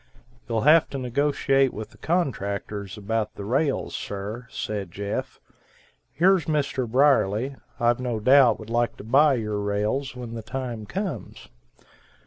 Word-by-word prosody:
"You'll 115 -1 0
have 155 +5 +5
to 140 - -5
negotiate 135 +1 +1
with 110 0 -6
the - - -20
contractors 100 - -2
about 105 +1 -2
the 100 - -7
rails, 135 +6 0
sir," 105 +4 -5
said 100 -6 -4
Jeff; 100 +2 -4 0.7
"here's 185 +1 +3
Mr. 140 -5 -1
Brierly, 130 -1 +3 0.2
I've 120 0 +2
no 120 -3 -2
doubt 130 +2 +6
would 110 0 -9
like 120 -1 0
to - - -9
buy 135 +6 +4
your 105 -3 -2
rails 105 +7 -1
when 120 -2 -7
the 115 - -5
time 120 -2 -5
comes." 195 -1 -5
120 Hz, 140 wpm, -25 LUFS, 105-140 Hz, 0.7 s, doubt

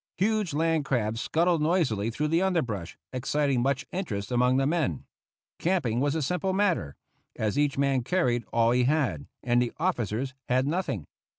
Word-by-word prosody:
Huge 205 -4 +1
land 160 0 +2
crabs 115 -4 -1
scuttled 170 +2 +1
noisily 150 - +1
through 150 +6 -2
the 165 +3 +2
underbrush, 125 - -1 0.2
exciting 135 0 0
much 135 +1 0
interest 115 - -4
among 125 +1 +3
the 135 - +2
men. 145 - 0 0.5
Camping 155 -11 +1
was 145 +3 +1
a 160 - 0
simple 180 +5 -1
matter, 185 - +1 0.4
as 110 +1 -1
each 145 -1 +1
man 140 -2 +2
carried 125 -5 +1
all 115 0 +3
he 125 0 +3
had, 135 - 0 0.2
and 120 0 +3
the 120 - 0
officers 130 - -1 0.2
had 130 +1 +2
nothing. 150 - -2
140 Hz, 165 wpm, -27 LUFS, 120-165 Hz, 0.5 s, among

